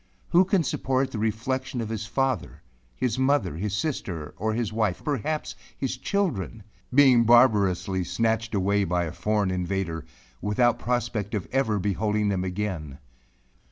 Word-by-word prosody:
Who 180 +2 +5
can 190 -2 +2
support 130 -1 0
the 110 - -4
reflexion 125 +4 -2
of 115 -2 -3
his 110 -1 -4
father 130 +1 -1 0.3
his 125 -1 -1
mother 135 - +2
his 105 +3 -2
sister 95 - -3
or 110 +5 -1
his 115 -2 -2
wife 105 -6 0
perhaps 150 +2 -2 0.2
his 135 -1 -2
children 125 - -2 0.3
being 130 -3 +6
barbarously 105 -6 +4
snatched 115 +3 0
away 100 +1 +2
by 90 -1 0
a 80 - -3
foreign 100 +2 0
invader, 90 -2 -2 0.4
without 115 +4 +2
the - - -15
prospect 115 -4 -1
of 100 - -3
ever 120 -6 +1
beholding 105 +2 0
them 95 -2 0
again? 90 -7 -3
110 Hz, 150 wpm, -26 LUFS, 95-125 Hz, 0.4 s, being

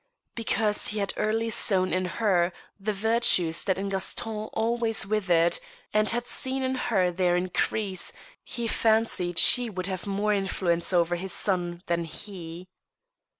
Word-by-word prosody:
Because 220 -2 +1
he 215 - -4
had 200 -1 -1
early 225 +2 0
sown 190 -4 +2
in 185 0 0
her 180 -2 +1 0.3
the 205 +2 -1
virtues 200 -6 +2
that 190 - +1
in 200 +1 -3
Gaston 210 +3 -2
always 225 -1 0
withered, 180 -5 +2 0.3
and 215 0 +3
had 240 +1 0
seen 265 +1 -2
in 260 0 0
her 195 -8 +1
their 175 0 +1
increase, 185 +1 -1 0.3
he 235 -1 -4
fancied 220 -7 +1
she 245 -2 +5
would 185 -3 -4
have 190 0 -4
more 205 +1 +1
influence 185 -3 0
over 175 -1 +2
his 185 0 -4
son 175 -3 -1
than 170 0 -1
he. 175 -1 -8
195 Hz, 150 wpm, -27 LUFS, 180-220 Hz, 0.3 s, she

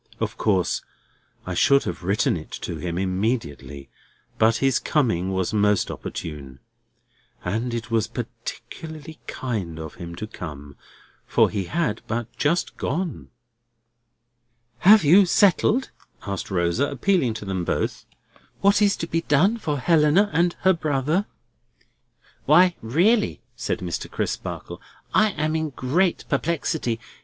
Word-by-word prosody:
Of - - -2
course 95 -5 +1 0.6
I 90 - -3
should 140 +10 +4
have - - -5
written 95 +3 +1
it 80 -2 -7
to 85 - -4
him 85 +2 -4
immediately; 95 - -2 0.5
but 110 +1 +4
his 135 0 +2
coming 95 - 0
was 95 +1 -1
most 105 -2 +2
opportune. 70 -5 -7 0.9
And 110 +7 -1
it 115 -1 -5
was 115 -2 +2
particularly 160 0 -8
kind 100 -11 -4
of 80 -1 -7
him 85 0 -7
to 110 - -5
come, 75 -8 -9 0.5
for - - +3
he 100 -3 -2
had 150 - -1
but 115 +1 -4
just 165 +4 0
gone." 170 +3 -3 1.5
"Have 210 +5 +7
you 180 +6 +6
settled," 205 +8 +3 0.3
asked 100 -2 -4
Rosa, 90 +9 +1
appealing 175 - +1
to 110 - -6
them 95 -2 -2
both, - - -2 0.5
"what 200 +1 +4
is 205 -1 +4
to 165 - -4
be 165 0 0
done 170 +9 +3
for 150 -9 -2
Helena 165 +7 +3
and 170 +2 +2
her 190 0 +5
brother?" 155 +4 0 1.2
"Why 180 0 +6
really," 185 - +2 0.2
said 130 -3 -3
Mr. 90 -2 -4
Crisparkle, - - -4 0.3
"I 215 0 +5
am 155 +1 -1
in 160 -1 -1
great 155 +8 0
perplexity. 145 -5 -1
125 Hz, 130 wpm, -24 LUFS, -, 1.5 s, Have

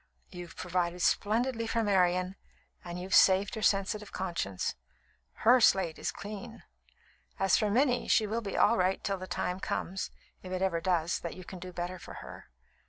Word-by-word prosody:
"You've 175 -1 -9
provided 175 -1 -1
splendidly 230 +2 +1
for 230 0 0
Marian 185 -2 +2 0.5
and 175 0 -6
you've 185 +1 -5
saved 195 +1 +5
her 220 - -4
sensitive 210 +1 +1
conscience. 170 - -2 0.7
Her 245 +2 +7
slate 190 -7 +3
is - - -2
clean. 215 +3 -8 0.7
As 195 -2 +3
for 210 - +2
Minnie, 250 +3 +2
she 220 - +4
will 220 +3 -2
be 200 -3 -4
all - - +4
right 185 +1 +2
until 195 -2 -3
the 185 - -7
time 180 0 -2
comes, 190 0 -3 0.3
if 185 - -9
it 185 0 -1
ever 170 -3 0
does, 175 -1 +1
that 170 - -6
you 185 - -9
can 185 +1 -9
do 185 +1 -8
better 175 +1 -5
for - - -10
her. - - -10
190 Hz, 175 wpm, -30 LUFS, 180-210 Hz, 0.7 s, Her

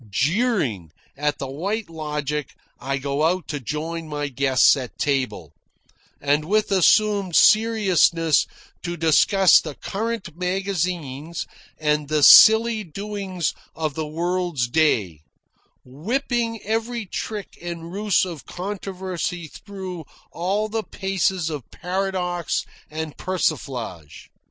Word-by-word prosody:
Jeering 150 - 0 0.3
at 145 +1 -1
the - - -4
White 195 +11 -3
Logic, 150 -2 -3 0.3
I 135 +2 -2
go 140 +2 -2
out 175 +3 +1
to 145 - -3
join 160 +5 -4
my 145 -1 -3
guests 135 +1 +4
at 130 -4 -7
table, 125 - -1 0.7
and 145 +2 +1
with 210 +4 +1
assumed 200 -1 +3
seriousness 190 -8 +4 0.3
to 175 0 -4
discuss 170 +4 +5
the 155 -3 -7
current 220 -5 -4
magazines 175 -5 -2 0.3
and 150 -1 0
the 150 0 +1
silly 220 +3 +8
doings 195 0 -4 0.2
of 155 -2 -2
the 155 +1 -4
world's 170 -4 -1
day, 115 - +1 0.6
whipping 230 - -2
every 225 +1 -2
trick 205 +1 -5
and 170 0 -6
ruse 205 -2 +2
of 170 -6 -8
controversy 185 -2 -4
through 190 -5 -8 0.3
all 195 +5 -1
the 220 +1 -2
paces 190 -4 -1
of 145 -6 -6
paradox 180 -2 -2 0.2
and 155 -1 -5
persiflage. 125 - -3
170 Hz, 115 wpm, -23 LUFS, 150-195 Hz, 0.7 s, silly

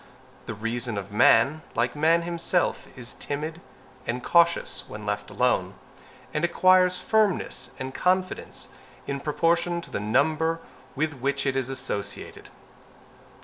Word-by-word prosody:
The - - -4
reason 115 +1 -2
of 100 0 -5
man, 115 +8 +5
like 120 +3 +1
man 165 +3 +3
himself, 170 +1 0
is 125 0 -6
timid 155 +4 -4 0.5
and 125 +1 -2
cautious 170 0 +3
when 105 0 -8
left 105 0 -2
alone, 110 -7 +1 0.6
and 150 - -1
acquires 185 +1 +4
firmness 215 -3 0
and 130 0 -5
confidence 185 +3 -1 0.4
in 140 0 -3
proportion 170 +4 +1
to 170 - -11
the - - -2
number 155 +9 +1 0.4
with 155 +2 0
which 140 +2 -1
it 135 -1 +1
is 135 -1 -1
associated. 125 -7 -5
140 Hz, 130 wpm, -26 LUFS, 120-170 Hz, 0.6 s, man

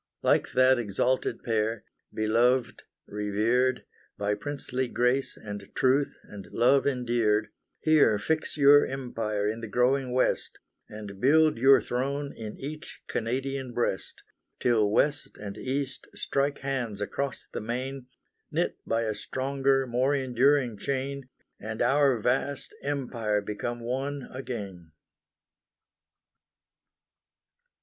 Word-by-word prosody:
Like - - +2
that 130 0 +5
exalted 120 +4 -1
Pair, 110 -1 0 0.3
beloved, 120 +3 +1 0.2
revered, 110 +5 0 0.3
By 100 0 0
princely 130 +3 -3
grace, 125 +3 +1
and 100 -2 -8
truth 135 +2 +2
and 100 -2 -10
love 135 +4 +3
endeared, 120 -5 +1 0.3
Here 150 -9 +5
fix 155 +10 -1
your 145 0 +7
empire 115 -6 -2
in 110 +2 -2
the 115 - -5
growing 125 +4 +1
West, 130 +1 0 0.3
And 105 -2 -9
build 155 0 +4
your 135 +2 +7
throne 140 +3 -2
in 110 -2 -7
each 155 +4 -8
Canadian 130 +2 -3
breast, 120 -5 -2 0.4
Till 110 -4 +3
West 145 +7 0
and 100 -1 -6
East 135 +4 -3
strike 140 +1 -1
hands 125 -6 -2
across 135 +6 -3
the - - -3
main, 125 +3 -4 0.4
Knit - - -1
by 115 +1 +1
a 110 -1 -1
stronger, 135 +3 0
more 130 +3 +1
enduring 130 -3 +2
chain, 135 +2 -3 0.3
And 110 +1 -6
our 135 +1 +3
vast 130 +5 -1
Empire 120 -7 -1
become 110 +4 -4
one 135 +3 -3
again. 100 - -7
125 Hz, 115 wpm, -28 LUFS, 110-135 Hz, 0.4 s, your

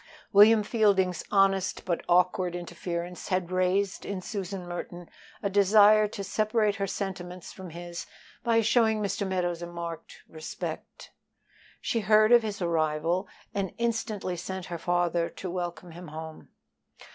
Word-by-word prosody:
William 210 +2 +7
Fielding's 200 -5 +2
honest 195 -1 +2
but 175 -2 -1
awkward 180 0 +3
interference 175 0 -5
had 185 -2 -1
raised 185 +2 +1
in 200 -2 -4
Susan 190 -2 -5
Merton 175 0 -6 0.4
a - - +2
desire 210 +2 +6
to 205 -1 -6
separate 215 0 +1
her 200 0 -1
sentiments 185 -2 -5
from 190 -2 -9
his 175 +1 -7 0.4
by 230 -1 +3
showing 220 -1 +3
Mr. 200 -1 -1
Meadows 175 -2 -1
a 175 - -4
marked 170 -1 -7
respect. 155 -1 -7 0.7
She 230 - 0
heard 215 +1 +4
of 240 -1 +8
his 210 -4 -4
arrival 165 +2 0 0.3
and 195 -2 -3
instantly 225 -5 -2
sent 185 +1 -5
her 170 -1 -6
father 175 -1 +1
to 185 - -7
welcome 175 -1 -5
him 175 +1 -10
home. 160 +1 -9
185 Hz, 140 wpm, -28 LUFS, 175-205 Hz, 0.7 s, of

